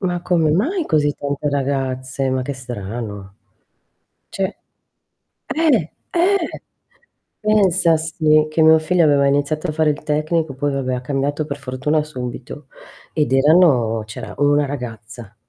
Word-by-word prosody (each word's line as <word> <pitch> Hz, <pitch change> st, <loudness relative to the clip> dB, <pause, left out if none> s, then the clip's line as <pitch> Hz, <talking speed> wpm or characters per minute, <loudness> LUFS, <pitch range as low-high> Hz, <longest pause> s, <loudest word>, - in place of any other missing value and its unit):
Ma 180 Hz, -2 st, -1 dB
come 170 Hz, -3 st, +1 dB
mai 305 Hz, -, 0 dB
così 145 Hz, -, +1 dB
tante 145 Hz, +1 st, -3 dB
ragazze? 135 Hz, -1 st, -2 dB
Ma 130 Hz, 0 st, 0 dB
che 140 Hz, -, -4 dB
strano. 105 Hz, -5 st, -7 dB, 1.0 s
Cioè 190 Hz, -1 st, -3 dB, 0.9 s
eh, 285 Hz, -, +1 dB, 0.2 s
eh, 360 Hz, 0 st, +1 dB, 0.8 s
pensa 190 Hz, -6 st, +3 dB
sì, 155 Hz, -1 st, +2 dB
che 155 Hz, +1 st, +2 dB
mio 160 Hz, 0 st, +7 dB
figlio 170 Hz, +2 st, +2 dB
aveva 140 Hz, -2 st, +4 dB
iniziato 145 Hz, +4 st, 0 dB
a -, -, -1 dB
fare 155 Hz, 0 st, +2 dB
il 145 Hz, -, -7 dB
tecnico, 155 Hz, 0 st, -1 dB
poi 145 Hz, +2 st, -1 dB
vabbè 130 Hz, -2 st, -1 dB
ha 125 Hz, -, -4 dB
cambiato 140 Hz, +3 st, -2 dB
per 140 Hz, -2 st, -5 dB
fortuna 140 Hz, +3 st, -1 dB
subito, 130 Hz, -1 st, -7 dB, 0.5 s
ed 150 Hz, -4 st, 0 dB
erano 135 Hz, -6 st, +4 dB
c'era 110 Hz, -, -8 dB
1 145 Hz, 0 st, +3 dB
ragazza, 120 Hz, -5 st, -8 dB
145 Hz, 135 wpm, -19 LUFS, 130-160 Hz, 1.0 s, mio